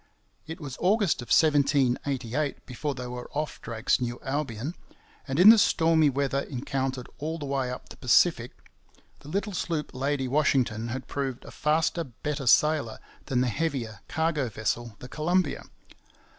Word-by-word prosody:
It 160 +3 -7
was 140 -5 -7
August 195 - +2
of 120 - -9
1788 140 -2 +1
before 135 +3 -4
they 125 0 -6
were 125 0 -7
off 150 +1 -3
Drake's 115 +1 0
New 120 -1 -3
Albion; 135 0 -3 0.5
and 135 +3 -2
in 190 +4 +10
the 225 0 +9
stormy 160 -5 +4
weather 140 0 0
encountered 130 -1 -3
all 160 +3 -3
the 150 - -6
way 135 -2 -1
up 125 - -7
the - - -11
Pacific, 125 -1 +3 0.7
the 145 - -13
little 200 +4 -2
sloop 160 -3 -3
Lady 135 0 -1
Washington 125 -5 +1
had 130 +1 -5
proved 135 -3 -4
a - - -10
faster, 160 +3 +1
better 140 +1 -5
sailer 150 -3 +3 0.3
than 125 -2 +1
the 130 - +1
heavier 120 -6 -2
cargo 160 -5 0
vessel, 110 +1 -3
the 125 - -10
Columbia. 160 +2 0
140 Hz, 155 wpm, -27 LUFS, 125-155 Hz, 0.7 s, in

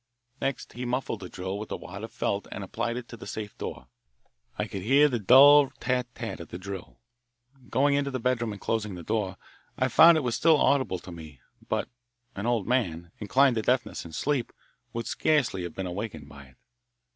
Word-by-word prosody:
Next 135 -1 -3
he 125 - -6
muffed 125 -2 -2
the 90 - -8
drill 95 +2 -5
with 105 - -7
a - - -2
wad 100 +4 -9
of 110 - -7
felt 100 0 -2
and 100 - -5
applied 115 +5 -3
it 125 -1 -6
to 115 - -9
the - - -10
safe 105 -2 -6
door. 65 - -6 0.7
I - - -1
could 95 - -6
hear 135 +8 +5
the 125 -5 -1
dull 140 +6 +8
tat 125 -1 0
tat - - -5
of - - -8
the - - -7
drill. 95 0 -8 0.7
Going 140 +4 +3
into 140 0 +1
the 130 -1 -3
bedroom 120 -2 0
and 100 - -7
closing 105 -3 -2
the 85 - -8
door, 100 -1 -2 0.4
I 130 - +1
found 165 +7 +8
that 155 - +2
it - - -7
was 120 -2 -1
still 160 +3 +4
audible 135 -10 +2
to 90 +1 -11
me, 80 -5 -11 0.3
but - - 0 0.5
an 100 +4 -3
old 115 -5 +1
man, 85 -10 -1
inclined 130 +4 +3
to - - +1
deafness 125 +3 0
and 85 - -10
asleep, 135 - -1 0.4
would 115 0 -4
scarcely 140 -11 +1
have 85 -2 -6
been 95 - -3
awakened 90 -5 -5
by 70 -1 -12
it. 65 -1 -21
115 Hz, 210 wpm, -27 LUFS, 95-130 Hz, 0.7 s, dull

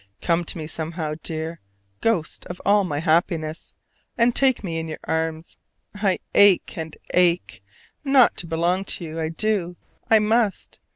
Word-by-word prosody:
Come 170 0 0
to - - -4
me 155 - -5
somehow, 160 0 -4
dear 160 +1 -5 0.4
ghost 210 -9 -1
of 175 - -7
all 205 0 +4
my 150 -6 -3
happiness, 160 -1 0 0.4
and 235 0 +3
take 265 -4 +3
me 165 -4 -3
in 160 - -5
your 155 - -6
arms! 160 0 -3 0.4
I 200 -2 0 0.2
ache 200 -3 +5
and 160 -1 -6 0.2
ache, 180 -1 +1 0.4
not 270 -4 +5
to 170 - -2
belong 170 +3 0
to 185 - -2
you. 160 +1 -6
I 160 -1 -1
do: 180 0 -1 0.3
I 225 - +7
must. 215 -1 0
170 Hz, 160 wpm, -23 LUFS, 160-205 Hz, 0.4 s, I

